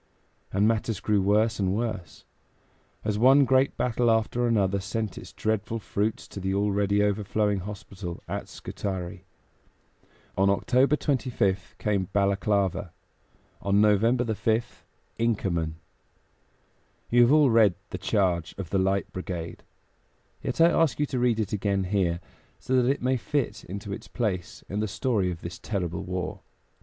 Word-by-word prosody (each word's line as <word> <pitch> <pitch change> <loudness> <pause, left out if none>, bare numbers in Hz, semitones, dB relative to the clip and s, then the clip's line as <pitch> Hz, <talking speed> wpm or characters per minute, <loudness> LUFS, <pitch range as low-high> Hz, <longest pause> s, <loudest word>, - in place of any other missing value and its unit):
And 100 +2 +3
matters 115 -1 0
grew 105 -2 +1
worse 105 +4 +2
and 95 -1 +1
worse, 110 -7 -4 0.8
as 105 -1 0
one 135 +4 +6
great 130 +1 +2
battle 120 -1 +1
after 115 +2 +2
another 100 -4 +2
sent 110 +1 -3
its - - -9
dreadful 110 +1 -1
fruits 105 0 -2
to - - -7
the 95 0 -1
already 100 0 +2
overflowing 105 0 0
hospital 95 -2 -7
at - - -4
Scutari. 95 -1 -5 1.1
On 95 +1 +3
October 130 +8 +3
25th 120 -10 -1
came 100 -3 0
Balaklava; 100 -1 +1 0.7
on 100 0 +2
November 110 +4 +4
5th, 110 +1 -1 0.3
Inkerman. 90 -9 0 1.4
You 120 +1 +6
have 120 +2 +6
all 150 -4 +5
read 110 -5 +5 0.2
"The - - -4
Charge 90 -5 0
of 95 -5 -6
the 95 - +2
Light 95 +1 0
Brigade"; 90 -3 -5 0.8
yet - - -3
I 165 +1 +7
ask 165 -4 +2
you 150 - +3
to 135 -3 -3
read 120 -2 +2
it 105 -2 -2
again 100 -1 0
here, 90 -3 0 0.4
so 130 - -1
that 125 - +2
it 140 -2 0
may 130 +1 +2
fit 125 +4 -2
into 100 +2 -6
its - - -8
place 100 -7 -3
in 100 - -3
the 110 - 0
story 105 -3 0
of 85 -2 -5
this 85 +1 -7
terrible 95 -3 -3
war. 90 0 -4
105 Hz, 150 wpm, -27 LUFS, 95-115 Hz, 1.4 s, I